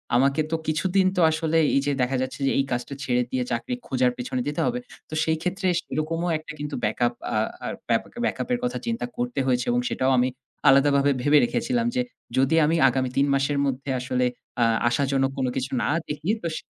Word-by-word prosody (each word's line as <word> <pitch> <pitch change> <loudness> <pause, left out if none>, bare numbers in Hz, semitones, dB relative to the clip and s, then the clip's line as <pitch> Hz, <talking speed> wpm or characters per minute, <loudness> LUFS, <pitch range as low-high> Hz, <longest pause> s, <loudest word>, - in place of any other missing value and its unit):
আমাকে 135 +4 +3
তো - - +2
কিছুদিন 185 +5 +2
তো - - +4
আসলে 160 0 0 0.2
এই 140 - +4
যে 145 - +1
দেখা 130 +1 +1
যাচ্ছে 130 +1 -4
যে - - +3
এই 135 - +2
কাজটা 120 +3 -2
ছেড়ে 125 -1 +1
দিয়ে 130 -1 0
চাকরি 120 - -2
খোঁজার 255 -1 +2
পেছনে 255 0 -3
দিতে 145 - -1
হবে। 245 0 0 0.3
তো - - -9
সেই 160 0 +1
ক্ষেত্রে 185 +2 -1
সেরকমও 165 +3 -2
একটা 155 0 -9
কিন্তু 145 0 -4
ব্যাকআপ 120 +3 +1 0.2
আ - - +2 0.3
আর - - -3 0.2
ব্যাপা 115 -1 +1 0.2
ব্যাকআপ 235 - -2
এর 245 - 0
কথা 245 - -1
চিন্তা 235 +1 -2
করতে 245 0 -2
হয়েছে। 125 -1 +1
এবং 120 - +2
সেটাও 130 +1 +1
আমি 125 +1 +3 0.4
আলাদাভাবে 140 +1 +5
ভেবে 145 +3 +5
রেখেছিলাম 235 - 0
যে 250 - +2 0.4
যদি 135 +5 +3
আমি 160 +2 +2
আগামী 130 -1 -1
৩ 140 +1 +4
মাসের 140 +1 +1
মধ্যে 135 +1 -3
আসলে 125 0 0 0.4
আ - - +6 0.3
আশাজনক 135 +1 +1
কোন 130 - 0
কিছু 130 0 -2
না - - 0 0.2
দেখি 150 +4 -4
তো - - 0
স - - -3
145 Hz, 205 wpm, -25 LUFS, 130-170 Hz, 0.4 s, আ